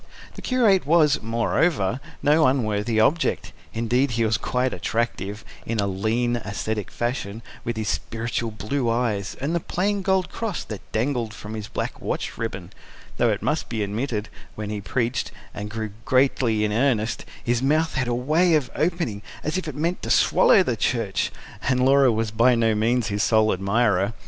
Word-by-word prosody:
The - - -10
curate 220 - +3
was, 155 -3 +4
moreover, 115 - +1 0.2
no 150 +1 +5
unworthy 110 -3 +1
object; 155 +9 +1 0.2
indeed 120 +4 +1
he 115 - +2
was 110 0 +2
quite 125 0 0
attractive, 105 0 -2 0.2
in 115 -1 -3
a 100 - +2
lean, 110 +5 0
ascetic 105 -1 -3
fashion, 115 -3 -3 0.2
with 120 -1 -3
his 110 -1 -2
spiritual 115 0 -2
blue 115 +4 -2
eyes, 115 -4 -1
and 140 +5 -1
the 170 - +2
plain 200 +4 -1
gold 190 -1 +1
cross 220 -6 -3
that 105 -3 -7
dangled 115 -1 -1
from 105 +1 -8
his 110 -2 -5
black - - -4
watch - - -3
ribbon 95 -6 -5 0.4
though, 120 - +3
it 105 -2 -1
must 155 +1 -1
be 110 -2 -1
admitted, 105 +1 -2 0.3
when 105 -1 -5
he 105 -1 -3
preached, 120 +3 -1 0.2
and 105 +1 -5
grew 110 -1 -4
greatly 130 -4 +2
in 105 - -1
earnest, 115 -2 +1 0.2
his 120 0 +1
mouth 155 +4 +2
had 130 -2 -1
a 120 - 0
way 155 +7 +3
of 145 -5 0
opening 160 - -1 0.2
as 155 - -2
if 185 -3 -2
it 150 - -5
meant 170 +4 -1
to - - -5
swallow - - +5
the - - -1
church - - 0 0.3
and 130 -1 +1
Laura 135 -1 +5
was 110 -1 -1
by 120 +3 +4
no 115 -1 +2
means 115 +2 +1
his 100 0 -1
sole 110 -1 +3
admirer. 100 +1 +1
115 Hz, 175 wpm, -24 LUFS, 110-140 Hz, 0.4 s, no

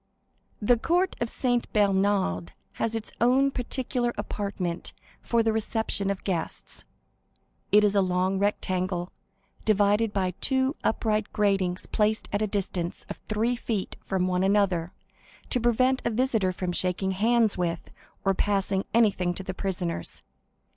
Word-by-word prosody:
The 230 +2 +3
court 355 +7 +1
of 235 - +1
Saint 245 -1 0
Bernard 195 - +1 0.3
has 230 0 0
its 220 -1 -3
own 265 +3 +4
particular 245 -1 -2
apartment 185 -4 -3 0.3
for 235 -1 +1
the 225 -1 +2
reception 220 -2 0
of 200 -1 -3
guests; 175 -4 -3 0.9
it 210 +1 +6
is 205 -1 +3
a 200 - +4
long 185 +1 +1
rectangle, 185 -3 -1 0.5
divided 210 +1 +3
by 190 -3 0
two 265 +1 +2
upright 215 -1 0
gratings 195 -4 +1
placed 215 0 0
at 205 - +1
a 215 - +1
distance 185 -4 -3
of - - -5
three 225 +3 +1
feet 220 -5 -3
from 190 -1 0
one 180 0 +1
another 190 -4 +2 0.6
to 250 - +2
prevent 255 +3 +3
a - - +1
visitor 225 -5 +1
from 180 0 -3
shaking 185 +2 0
hands 225 +3 +3
with 170 -2 -3 0.3
or 195 - +4
passing 195 -1 0
anything 195 -6 +3
to 190 - -4
the 190 0 -4
prisoners. 180 - -4
205 Hz, 140 wpm, -27 LUFS, 185-225 Hz, 0.9 s, it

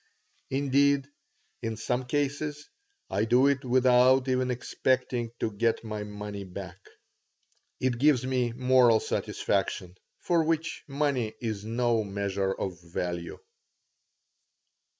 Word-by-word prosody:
Indeed, 140 +1 +2 0.5
in 115 -2 -3
some 125 +3 -1
cases 145 +2 -2 0.4
I 105 - +1
do 125 +4 +4
it 140 -1 +2
without 130 +1 +4
even 130 0 +1
expecting 125 -1 -1
to 110 - -1
get 115 +3 0
my 105 -2 -4
money 105 -1 -6
back. 95 -1 -8 1.0
It 125 -2 0
gives 140 -3 +4
me 125 -2 0
moral 125 -2 +5
satisfaction, 90 -3 -2 0.2
for 170 -2 +1
which 165 0 -1
money 140 -6 -1
is 110 -4 -3
no 115 0 +1
measure 100 -1 -2
of 95 -2 -4
value. 85 0 -4
125 Hz, 110 wpm, -28 LUFS, 105-130 Hz, 1.0 s, moral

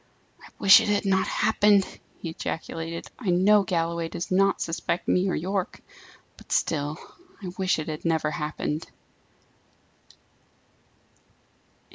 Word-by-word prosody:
"I - - -14
wish 195 +2 +8
it 225 - -2
had 205 0 +1
not 190 -1 +2
happened!" 205 -3 +3 0.4
he 165 - -3
ejaculated. 165 +1 -5
"I 220 -7 -3
know 195 +4 +5
Galloway 170 -2 -1
does 170 - -6
not 195 +1 +3
suspect 165 +1 -2
me 185 +1 +2
or - - 0
Yorke: 190 +3 -3 0.6
but - - -16
still 150 0 0 0.5
I 180 - -5
wish 190 -1 +2
it 155 - -4
had 155 -1 -5
never 160 -2 0
happened!" 150 +1 -4
180 Hz, 125 wpm, -26 LUFS, 165-195 Hz, 0.6 s, wish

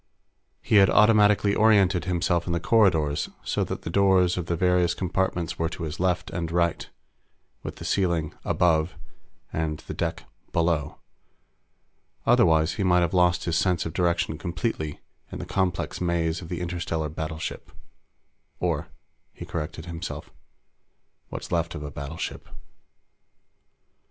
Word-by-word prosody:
He 105 - +3
had 95 -1 +7
automatically 105 -2 +5
oriented 100 -5 +4
himself 85 -1 0
in 85 - 0
the 85 - +1
corridors 85 -9 +2
so - - 0
that - - -5
the 80 - -4
doors 95 -2 +4
of 90 -2 -4
the 85 - 0
various 90 0 +2
compartments 90 -2 -2
were 80 0 0
to 85 - -7
his 80 0 -5
left 90 0 0
and 85 -2 -3
right, 85 -1 0 0.7
with - - -6
the - - -9
ceiling 85 -5 0
"above" 80 -1 +2 0.6
and 80 -1 -1
the - - -6
deck - - -3 0.3
"below." 85 -3 0 1.3
Otherwise, 80 0 +4
he 100 - -2
might 90 -1 +4
have 85 +1 0
lost 90 -1 +3
his 85 -2 0
sense 90 0 +1
of 80 - -4
direction 85 -3 0
completely 85 -4 -3 0.3
in - - -5
the - - -6
complex 95 -2 -1
maze 85 -1 0
of 80 - -9
the 90 -1 -4
interstellar 85 -2 -2
battleship. 80 +1 -5 0.9
Or, - - -1 0.4
he - - -9
corrected 80 0 -5
himself, 85 -1 -6 1.0
what's - - -7
left 85 0 0
of 75 - -6
a 75 - -6
battleship. 70 +3 -6
85 Hz, 140 wpm, -25 LUFS, 80-90 Hz, 1.3 s, had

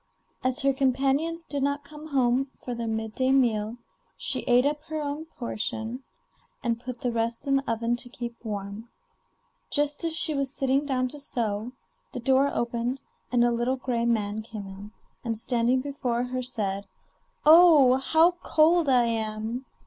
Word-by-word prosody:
As 255 +1 +1
her 275 0 +3
companions 275 +5 +1
did 285 -1 -3
not 285 +1 0
come 300 +1 -10
home 265 -2 +2
for 245 - -6
their 235 -1 -4
mid 220 -1 -3
day 260 +2 +1
meal, 230 -4 +2 0.4
she - - -1
ate 245 +1 +5
up 295 +1 0
her 315 0 -4
own 295 +1 -4
portion 235 -3 -4 0.6
and 230 -2 0
put 250 0 -7
the 245 - 0
rest 230 +2 -2
in 275 -1 +3
the 270 -3 -2
oven 230 +1 0
to 245 0 -8
keep 240 -1 -7
warm. 205 +1 -5 0.8
Just 290 +1 0
as 325 -1 0
she 320 -1 +2
was 275 -2 -1
sitting 275 +1 +1
down 255 -2 +1
to 295 - -8
sew, 230 -4 -2 0.4
the 255 - -4
door 265 +3 +3
opened 240 +2 -2 0.3
and 245 -1 +4
a 240 - +3
little 240 +3 0
gray 240 -2 -1
man 215 -2 0
came 215 -2 -8
in, 195 +2 -10 0.3
and, 230 -2 -2
standing 245 +2 +1
before 255 -4 -2
her, 255 +1 -3
said: 205 -5 -2 0.6
'Oh! 305 -5 +8
how 320 +6 +4
cold 320 0 +3
I 250 -2 +5
am! 225 +2 -2
250 Hz, 170 wpm, -27 LUFS, 230-280 Hz, 0.8 s, Oh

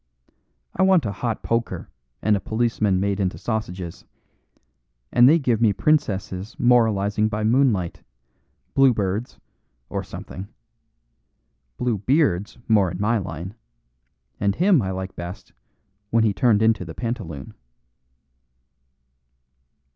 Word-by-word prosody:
I - - 0
want 190 -6 +4
a 100 - -1
hot 115 +3 -3
poker 115 0 -2 0.4
and 105 -1 +3
a - - 0
policeman 110 -3 0
made 100 +1 -1
into 95 -2 -1
sausages, 95 -6 -4 1.1
and 120 +1 +6
they 160 - +6
give 120 -7 0
me 110 -3 +4
princesses 100 -7 0
moralising 110 -3 +3
by 105 0 -2
moonlight, 110 -7 +1 0.7
Blue 135 -3 +5
Birds, 105 +4 -2 0.5
or - - -3
something. 95 +2 -8 1.3
Blue 120 -4 -1
Beard's 105 - +1
more 105 -4 +4
in 90 +1 -6
my 110 +2 +2
line, 90 0 -6 0.9
and 100 0 +1
him 180 -5 +4
I 95 - -2
like 95 0 -5
best 85 +2 -8 0.6
when 115 +1 +3
he 105 -2 +2
turned 105 +3 +3
into 110 -4 +3
the 80 -2 -9
pantaloon." 105 - -5
105 Hz, 120 wpm, -23 LUFS, 95-120 Hz, 1.3 s, and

